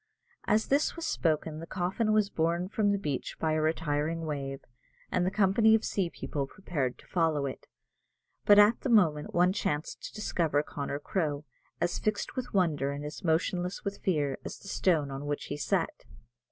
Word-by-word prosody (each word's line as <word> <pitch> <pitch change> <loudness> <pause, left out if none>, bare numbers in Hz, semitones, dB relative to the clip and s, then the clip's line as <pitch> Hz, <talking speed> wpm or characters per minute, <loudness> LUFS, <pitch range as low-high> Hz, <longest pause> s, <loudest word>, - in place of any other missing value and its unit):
As 215 +1 +3
this 280 +2 +2
was 335 -1 -5
spoken 155 - 0
the 165 - -8
coffin 190 +5 0
was 210 -2 +2
borne 170 +3 0
from 210 -1 +2
the 200 - +2
beach 145 -9 -3
by 160 - +1
a 155 0 +1
retiring 160 +1 0
wave, 135 -3 -4 0.5
and 180 0 +1
the - - +3
company 215 +3 +4
of 220 - 0
sea 190 -4 0
people 140 -4 -4
prepared 140 -8 -3
to - - -18
follow 160 -5 +1
it; 135 - -6 0.8
but 205 - +7
at 210 +3 +6
the 270 - -2
moment 165 -10 +3
one 180 +1 +4
chanced 150 -6 -2
to - - -8
discover 165 -8 0
Connor 140 -1 -4
Crowe, 150 -1 -2 0.3
as 175 - 0
fixed 215 -1 -2
with 255 -1 -4
wonder 155 -8 +1
and 145 +1 -5
as 150 - -7
motionless 175 +2 0
with 200 0 -4
fear 145 -7 0
as - - -6
the - - -14
stone 160 -8 +1
on 135 +2 -5
which 145 0 -2
he - - -2
sat. - - 0
165 Hz, 185 wpm, -30 LUFS, 150-200 Hz, 0.8 s, but